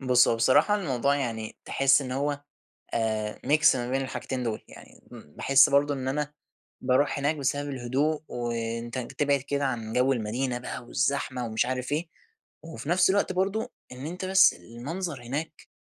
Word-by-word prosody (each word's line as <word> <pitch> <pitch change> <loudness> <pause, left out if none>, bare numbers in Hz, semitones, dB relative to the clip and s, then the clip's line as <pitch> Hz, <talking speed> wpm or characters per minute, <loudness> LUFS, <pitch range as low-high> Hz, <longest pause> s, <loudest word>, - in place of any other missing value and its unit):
بُص 125 -2 +4
هو 115 - +2
بصراحة 145 - +4
الموضوع 140 - +1
يعني 115 -5 -4
تحس 135 +1 +4
إن 130 -1 -5
هو، 145 +2 -1 0.5
آآ 110 -2 -1
ميكس 155 0 +5
ما 120 -1 -3
بين 135 +1 +1
الحاجتين 130 -1 -4
دُول، 115 -3 -2
يعني - - -15
م - - -9 0.2
باحس 135 0 +5
برضه 145 +1 +3
إن 130 -2 -4
أنا 150 +2 -2 0.5
باروح 135 +3 +2
هناك 145 +3 +1
بسبب 145 0 -1
الهدوء، 135 +4 -1
وأنت 115 0 -3
ن 125 -2 -3
تبعد 140 +1 +1
كده 140 +1 -2
عن 115 -4 -3
جو 125 +2 +3
المدينة 120 +2 -2
بقى 125 0 -6
والزحمة 130 -1 -1
ومش 110 0 0
عارف 125 +1 -3
إيه، 160 +3 -1 0.5
وفي 160 -2 -8
نفْس 180 +1 +4
الوقت 195 -1 +2
برضه 195 +4 -1 0.2
إن 125 +2 -8
أنت 180 +3 -5
بس 190 0 +6
المنظر 145 +5 -6
هناك، 150 +6 -5
135 Hz, 170 wpm, -27 LUFS, 120-145 Hz, 0.5 s, بس